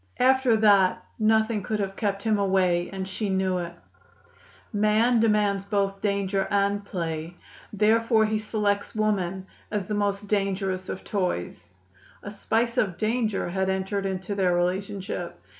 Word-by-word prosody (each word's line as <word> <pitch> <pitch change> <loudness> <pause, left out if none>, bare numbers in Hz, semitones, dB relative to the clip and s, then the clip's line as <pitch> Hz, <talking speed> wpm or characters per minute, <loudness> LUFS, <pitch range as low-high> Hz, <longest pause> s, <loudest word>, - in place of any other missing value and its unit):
After 260 -2 +4
that 200 -4 +4
nothing 220 0 +2
could 215 +2 -2
have 195 -1 -2
kept 200 -1 -2
him 215 -2 +2
away, 185 -3 +2
and 190 -1 -4
she 200 +2 -3
knew 190 -1 0
it. 170 -1 -5 1.0
"Man 215 +3 +3
demands 210 -3 +2
both 195 -1 -1
danger 200 -1 0
and 200 0 +1
play; 165 -3 -4 0.3
therefore 220 +2 +3
he 215 0 0
selects 210 -1 -1
woman 190 -3 -1 0.2
as 205 -3 -2
the 210 - -4
most 205 0 -1
dangerous 195 -2 -1
of - - -5
toys." 95 - -3 0.5
A 205 - -6
spice 230 +4 0
of 190 -5 0
danger 220 -2 0
had 190 +1 -1
entered 190 +1 -1
into 190 +1 -3
their 185 -3 +2
relationship. 190 +2 -2
200 Hz, 140 wpm, -26 LUFS, 190-215 Hz, 1.0 s, After